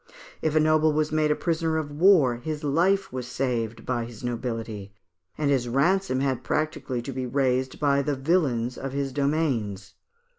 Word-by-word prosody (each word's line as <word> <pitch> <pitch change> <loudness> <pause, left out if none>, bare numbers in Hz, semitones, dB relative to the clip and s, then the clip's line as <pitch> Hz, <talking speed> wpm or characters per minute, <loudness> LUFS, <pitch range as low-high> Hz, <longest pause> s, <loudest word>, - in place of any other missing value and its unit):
If 155 -1 0
a - - +6
noble 155 0 +4
was 155 0 0
made 155 0 +2
a 150 - +3
prisoner 160 -1 0
of 150 -2 -3
war, 150 -6 +4
his 150 +4 -5
life 175 +5 +1
was 125 -1 -4
saved 120 -3 -2
by 120 -2 -1
his 115 -1 -11
nobility, 115 -4 -4 0.4
and 145 -2 +1
his 125 -3 +1
ransom 140 +1 +2
had 130 -3 -1
practically 145 -5 -2
to 135 - -5
be 130 -1 -3
raised 130 0 0
by 140 -1 +3
the 145 +1 -1
"vilains" 135 -5 0
of 135 -1 -5
his 140 -1 -2
domains. 130 -10 -1
135 Hz, 175 wpm, -26 LUFS, 120-155 Hz, 0.4 s, a